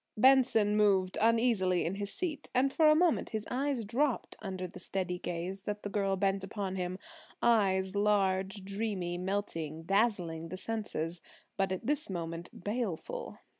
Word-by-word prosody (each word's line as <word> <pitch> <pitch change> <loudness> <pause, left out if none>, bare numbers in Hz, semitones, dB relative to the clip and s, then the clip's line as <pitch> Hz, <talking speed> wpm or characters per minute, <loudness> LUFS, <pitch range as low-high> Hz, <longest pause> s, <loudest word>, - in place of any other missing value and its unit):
Benson 250 -4 +5
moved 195 -3 +3
uneasily 225 -6 +3
in 170 - -1
his 200 0 -4
seat, 315 -5 -4
and 270 +2 +3
for 315 - +5
a 305 - +7
moment 340 0 +2
his 215 -1 -4
eyes 265 -2 0
dropped 250 +4 0
under 190 -3 -4
the 180 0 -9
steady 180 -1 -2
gaze 175 +3 -4
that 210 0 -4
the 205 - -3
girl 195 -2 +1
bent 195 0 +1
upon 195 -1 -4
him–eyes 190 - 0
large, 195 -1 +1
dreamy, 195 -4 -2
melting, 165 -5 -3
dazzling 180 -5 +1
the 185 - -5
senses, 180 -6 -2 0.3
but 195 -1 0
at 185 - -3
this 290 -4 0
moment 170 -1 -4
baleful. 230 - -3
200 Hz, 150 wpm, -32 LUFS, 185-225 Hz, 0.3 s, a